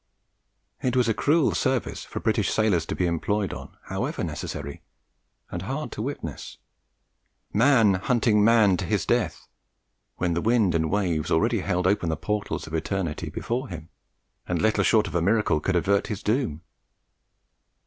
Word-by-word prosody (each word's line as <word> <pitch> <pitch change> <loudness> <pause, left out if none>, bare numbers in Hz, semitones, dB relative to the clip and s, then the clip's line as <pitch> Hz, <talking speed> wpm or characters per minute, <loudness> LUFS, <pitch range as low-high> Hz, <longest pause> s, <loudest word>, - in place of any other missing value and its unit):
It 125 -1 0
was 125 -2 +3
a 115 - +3
cruel 150 +6 +2
service 130 -2 -1
for - - -6
British - - +1
sailors 95 -7 +1
to - - -3
be 90 - 0
employed 95 +4 -1
on, - - -10
however - - -3
necessary, 70 0 -5 0.7
and 90 - -4
hard 135 - -4
to - - -5
witness. 110 - -6 1.0
Man 115 -3 +5
hunting 105 +1 +2
man 105 -4 +5
to - - -3
his - - 0
death, - - -1 0.7
when 90 -1 0
the 85 - 0
wind 110 -4 +3
and 80 -1 +1
waves 90 -7 0
already - - +2
held 90 0 -1
open 95 -3 +2
the 80 - -1
portals 105 +2 -3
of 80 - -11
eternity 80 0 -2
before 125 +3 -3
him, 80 -2 -8 0.6
and 90 -1 -1
little 110 +3 +2
short 110 -2 +4
of - - -6
a 85 - +1
miracle 100 -3 +2
could 90 +5 -1
avert 100 +3 +2
his 105 -2 -5
doom! 105 - -1
100 Hz, 160 wpm, -25 LUFS, 85-115 Hz, 1.0 s, Man